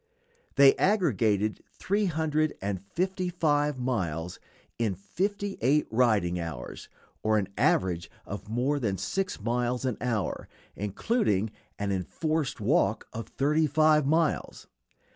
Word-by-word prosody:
They 140 -1 +7
aggregated 110 - +2
three 205 +2 0
hundred 155 -2 0
and 95 -2 -3
fifty 185 - -2
five 150 -4 +1
miles 90 -10 -2 0.4
in 110 -5 0
fifty 195 - -3
eight 140 +6 +3
riding 105 -7 +2
hours, 80 -7 -6 0.3
or 110 0 +2
an 100 -2 -1
average 90 -2 +1 0.2
of 100 +1 -7
more 130 +6 0
than 100 -7 -1
six 190 - -2
miles 120 +3 -1
an 125 -4 -1
hour, 115 -5 -2 0.3
including 105 - 0 0.3
an 100 -1 -2
enforced 140 - -1
walk 110 - +1
of 115 - -5
thirty 150 +3 +2
five 150 0 +4
miles. 160 0 0
125 Hz, 125 wpm, -28 LUFS, 100-155 Hz, 0.4 s, They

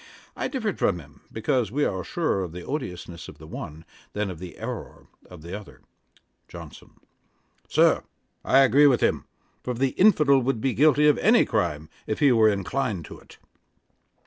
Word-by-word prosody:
I - - -2
differed 225 -7 -3
from 95 - +1
him, 75 -4 -15
because 110 -1 -1
we 145 +4 +1
are 95 -2 -2
surer 160 - -1
of 85 -3 -7
the 90 0 -8
odiousness 90 - -6
of - - -12
the 80 - -13
one, 80 0 -8 0.3
than 105 -2 -2
of 85 - -9
the 90 -1 -9
errour - - -7 0.2
of 90 -4 -12
the 85 +3 -6
other. 105 -1 -11 0.7
JOHNSON. - - -12 0.7
'Sir, - - +3 0.4
I 135 - +5
agree 135 +3 +5
with 125 -5 +3
him; - - +1 0.4
for 125 - -3
the 135 +3 +1
infidel 150 -7 +4
would 130 -2 -1
be 135 +1 0
guilty 150 +2 +4
of 150 - +4
any 230 +3 +4
crime 75 -2 -1 0.2
if 110 - -2
he 140 -2 +4
were 110 -2 +5
inclined 100 - -2
to - - -11
it.' - - -18
110 Hz, 175 wpm, -25 LUFS, 90-140 Hz, 0.7 s, I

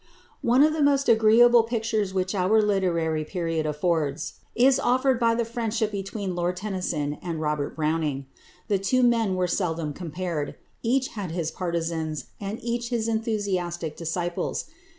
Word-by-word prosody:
One 245 +4 +5
of 310 +1 +4
the 315 - -1
most 280 -1 +3
agreeable 230 +1 +6
pictures 225 -3 -1
which 185 0 -1
our 200 +3 +3
literary 175 -7 +1
period 165 -2 -2
affords 150 -1 -1 0.2
is 255 +2 +5
offered 255 0 +2
by 230 -1 +3
the 235 0 0
friendship 225 -1 -1
between 195 -1 -4
Lord 175 +1 -1
Tennyson 180 -7 -2
and 170 -3 -4
Robert 150 -2 -2
Browning. 155 -3 -1 0.4
The 200 -2 +1
two 255 +6 +2
men 230 -5 +3
were 185 0 +1
not 180 - -2
seldom 165 -5 -1
compared; 170 -2 -4 0.3
each 260 +3 +1
had 200 -5 -5
his 165 -1 -2
partisans, 165 -4 -3
and 200 +2 -4
each 235 0 -2
his 230 -2 -1
enthusiastic 195 -8 -2
disciples. 170 +1 -2
190 Hz, 150 wpm, -25 LUFS, 165-230 Hz, 0.4 s, agreeable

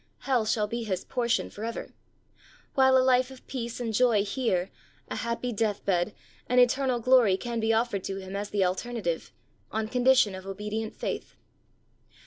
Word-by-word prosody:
Hell 250 -5 +1
shall 215 -1 +2
be 235 +3 -4
his 190 -5 -2
portion 235 -2 0
forever; 225 +3 -6 0.8
while 265 -1 +5
a 255 - +4
life 255 0 +4
of 265 -1 -13
peace 235 -2 -5
and 230 -2 -2
joy 220 -3 +3
here, 200 -5 -1 0.4
a - - -3
happy 235 +1 -2
death 210 -1 -1
bed, 185 +1 +1 0.3
and 250 0 +4
eternal 250 0 +3
glory 235 -5 +5
can 235 +2 -3
be 220 0 +1
offered 225 -4 +1
to 195 - -3
him 190 0 -7
as 205 +1 -3
the 200 -2 +2
alternative, 185 -2 -2 0.4
on 220 0 -1
condition 250 -3 +4
of 190 0 -8
obedient 210 +3 -4
faith. - - -4
225 Hz, 165 wpm, -28 LUFS, 200-250 Hz, 0.8 s, while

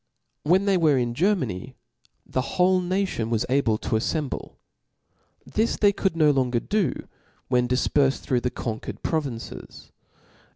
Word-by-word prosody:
When 185 +6 +3
they 195 -2 +3
were 155 -5 +3
in 120 -2 0
Germany, 130 - -1 0.5
the 130 0 -3
whole 185 +1 +4
nation 180 - -1
was 115 -2 0
able 125 -5 +2
to 110 - -2
af 110 - +1
femblc. 150 +1 -3 0.9
This 220 +2 0
they 205 -1 +4
could 190 -4 -1
no 155 -2 +5
longer 130 -3 +1
do, 205 - 0 0.6
whea 125 -1 +4
difpcrfed 135 +2 +2
through 125 -2 -1
the 125 - 0
conquered 110 -3 -6
provinces. 140 -8 -4
140 Hz, 140 wpm, -25 LUFS, 125-180 Hz, 0.9 s, no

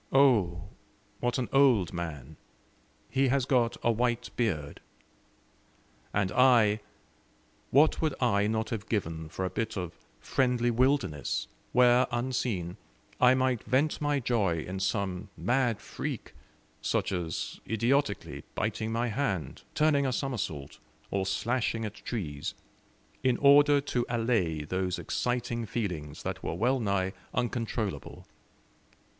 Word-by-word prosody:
Oh, 100 - +3 0.5
what 120 0 0
an 125 -2 -1
old 125 -11 +4
man! 80 -4 -5 0.7
He 135 0 +2
has 130 0 +2
got 120 -3 +2
a 120 - +4
white 120 +1 0
beard." 80 -12 -1 1.3
And 100 -3 0
I 115 -3 +5 0.9
what 145 +4 +4
would 155 -4 +1
I 105 -5 +2
not 110 +1 -1
have 110 -2 -4
given 80 -7 -2
for 95 +3 -3
a 90 - -3
bit 110 -2 -3
of 90 -3 -4 0.2
friendly 125 - +1
wilderness, 125 - +1 0.3
where, 125 +1 +5
unseen, 120 -8 -2 0.4
I 125 +1 +6
might 130 -3 +1
vent 140 +5 +1
my 145 -1 +1
joy 105 -10 +1
in 95 +1 -5
some 95 -1 -1
mad 120 -3 +1
freak, - - -5 0.5
such - - 0
as 85 -4 -3
idiotically 115 +1 0
biting 110 +1 -1
my 115 +1 0
hand; 100 - -2
turning 145 -3 +3
a - - 0
somersault, 110 - -3 0.3
or 95 -1 0
slashing 115 +3 0
at 105 - -5
trees, 80 - -5 0.7
in 130 -2 +2
order 145 +1 +6
to 125 -3 -1
allay 115 -10 0
those 90 +3 -1
exciting 120 -2 -2
feelings 90 -11 -4
that - - -4
were 80 - -3
well 125 +8 +2
nigh 100 -4 0 0.2
uncontrollable. 115 -4 -3
115 Hz, 125 wpm, -29 LUFS, 95-125 Hz, 1.3 s, I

